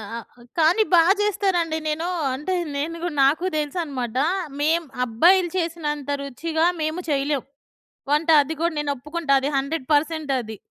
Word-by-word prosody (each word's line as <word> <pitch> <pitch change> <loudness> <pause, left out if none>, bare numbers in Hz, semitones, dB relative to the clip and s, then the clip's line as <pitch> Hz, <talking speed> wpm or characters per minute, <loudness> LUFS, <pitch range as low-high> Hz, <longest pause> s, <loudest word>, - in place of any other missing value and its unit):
ఆ! - - -4 0.4
కానీ 345 +8 +4
బా 340 - +8 0.2
చేస్తారండి. 375 -6 0
నేను 320 +3 -2 0.3
అంటే 300 +8 -2 0.2
నేనుగు 330 +4 -3
నాకు 310 +7 +2
దెలుసన్నమాట. 285 -6 -3 0.4
మేము 325 +3 +2 0.2
అబ్బాయిలు 345 +11 +4
చేసినంత 300 -5 -3
రుచిగా 320 +5 -1 0.2
మేము 315 +4 -2
చేయలేం. 280 -1 0 0.7
వంట 305 +3 +1
అది 315 +3 -5
గూడా 340 -1 +1
నేనొప్పుకుంటా. 295 +2 -2
అది 275 - -1
100% 295 +1 0
అది. 220 -3 -7
310 Hz, 125 wpm, -23 LUFS, 280-335 Hz, 0.7 s, బా